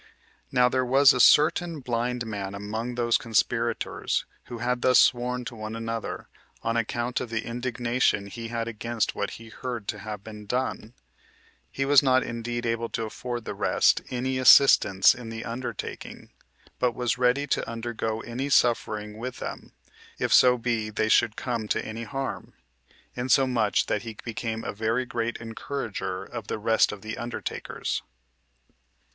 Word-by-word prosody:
Now 125 0 +4
there 130 +1 +1
was 135 +2 +6
a 125 - -2
certain 160 +5 +5
blind 120 -1 -2
man 100 -2 -5
among 110 +4 -4
those 120 -1 +2
conspirators 115 +1 0 0.2
who 120 - -7
had 120 +1 -1
thus 125 0 +5
sworn 125 0 +3
to 115 - -6
one 110 0 -6
another, 115 0 -4 0.4
on 115 0 0
account 120 +2 -1
of 120 - -5
the 115 -1 -3
indignation 120 -3 0
he 115 +3 -7
had 115 0 -3
against 115 0 -2
what 100 - -2
he 115 0 -12
heard 120 -2 -6
to 105 - -3
have 105 -1 -7
been 105 -1 -10
done; 125 -1 -2 0.7
he 135 - -2
was 140 0 +6
not 130 -1 +3
indeed 120 +1 -4
able 115 0 -1
to 115 - -3
afford 120 +1 -5
the - - -4
rest - - +3
any 130 +1 -2
assistance 120 -7 +7
in 120 -2 -9
the 115 0 -6
undertaking, 120 +2 -6 0.5
but 125 -2 +1
was 120 0 -1
ready 125 +3 +3
to 145 - -1
undergo 115 -1 -3
any 125 +5 -4
suffering 105 -4 +1
with 125 +2 -5
them, - - -7 0.5
if - - 0
so 125 0 +7
be 115 -2 -1
they 110 +1 -1
should 110 0 +4
come 120 -4 -3
to - - -1
any 115 +1 -5
harm, 130 -6 -5 0.6
insomuch 125 -4 +2
that 105 - -1
he 110 -1 -8
became 115 -1 -4
a - - -4
very 110 +4 0
great 115 -1 -2
encourager 115 -5 -5
of 115 -4 -8
the - - -2
rest 110 +1 +3
of 100 -2 -9
the 110 0 -5
undertakers. 120 0 -4
115 Hz, 160 wpm, -26 LUFS, 110-125 Hz, 0.7 s, assistance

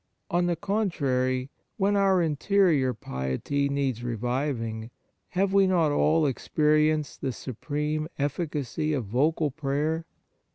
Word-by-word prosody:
On 175 +1 +2
the 175 - +1
contrary, 140 -10 0 0.3
when 200 0 +2
our 195 -3 +3
interior 160 -3 +2
piety 105 - -2
needs 135 -4 -1
reviving, 120 -1 -2 0.4
have 190 +1 0
we 195 -1 +5
not 170 -5 +3
all 155 +2 +3
experienced 150 +2 +1
the 135 - -1
supreme 150 +5 -3
efficacy 150 0 -2
of 130 -6 -1
vocal 145 +7 +1
prayer 150 +3 -1
150 Hz, 115 wpm, -27 LUFS, 130-165 Hz, 0.4 s, we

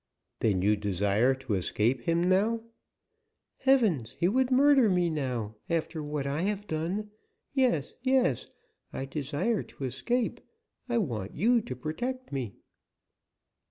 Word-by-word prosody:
"Then 95 -5 +1
you 105 +2 +4
desire 105 +5 +2
to 130 -4 -4
escape 105 +6 +1
him 170 +1 +2
now?" 205 +5 +2 0.9
"Heavens! 210 - +2
he 170 - +3
would 255 +6 +2
murder 270 -2 +5
me 180 -2 +2
now, 125 -8 -2 0.2
after 165 -1 -1
what 150 -1 -3
I 140 +3 -1
have 205 +2 -1
done. 185 +6 -3 0.4
Yes, 250 - +1
yes, 260 0 +2 0.4
I 135 - -4
desire 150 - -1
to - - -10
escape; 240 - -1 0.5
I 240 - +1
want 115 - -2
you 235 +7 +3
to 130 - -6
protect 245 - -4
me." 130 -8 -3
160 Hz, 130 wpm, -29 LUFS, -, 0.9 s, murder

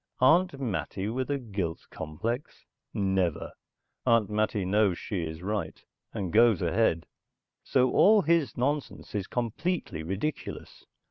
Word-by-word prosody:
Aunt 160 +3 +4
Mattie 105 -4 -2
with 130 +4 -2
a 145 - +1
guilt 100 -10 -4
complex? 115 - -5 0.3
Never! 95 -4 0 0.5
Aunt 115 -4 +3
Mattie 105 -2 0
knows 100 -1 +2
she 100 -5 -3
is 80 +1 -6
right, 100 -5 -3 0.3
and 95 -4 -4
goes 115 -3 +5
ahead. 85 -1 +2 0.6
So 130 -1 +2
all 210 -1 +6
his 165 -4 +2
nonsense 140 +3 -2
is 100 -2 -2
completely 125 - -2
ridiculous. 95 - -5
110 Hz, 125 wpm, -28 LUFS, 95-130 Hz, 0.6 s, all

